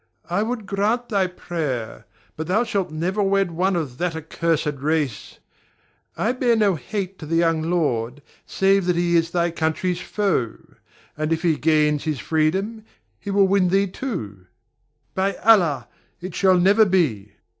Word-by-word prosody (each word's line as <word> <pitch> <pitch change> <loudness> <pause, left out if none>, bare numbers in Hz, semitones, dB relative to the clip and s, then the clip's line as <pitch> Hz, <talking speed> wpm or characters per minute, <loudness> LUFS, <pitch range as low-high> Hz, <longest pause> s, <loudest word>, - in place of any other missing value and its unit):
I 190 +4 +1
would 225 -1 -3
grant 210 +5 -1
thy 195 -3 +1
prayer, 155 -10 -5 0.3
but 160 0 -5
thou 210 +6 +2
shalt 200 -5 -2
never 175 +7 -2
wed 195 -2 +1
one 185 +3 0
of 140 -7 -4
that 175 -2 -1
accursed 160 -2 -1
race. 145 -6 -2 0.8
I 225 - +1
bear 250 -2 +2
no 210 -3 +3
hate 195 +3 -5
to 155 - -8
the 165 - -1
young 165 -1 +2
lord, 145 -6 -1 0.2
save 195 -1 +2
that 180 - +2
he 170 0 +1
is 165 0 +2
thy 170 0 0
country's 170 +2 -1
foe; 190 - -1 0.6
and 155 +1 -2
if 165 +1 0
he 165 -3 +3
gains 150 -1 +2
his 155 -3 -1
freedom, 190 +8 -1 0.4
he 200 - -7
will 200 0 +4
win 190 -1 +3
thee 195 +2 +3
too. 165 - -6 0.7
By 195 +1 0
Allah! 170 - +3 0.3
it 180 0 -7
shall 190 0 +3
never 200 +5 +5
be. 145 - 0
175 Hz, 160 wpm, -22 LUFS, 155-195 Hz, 0.8 s, never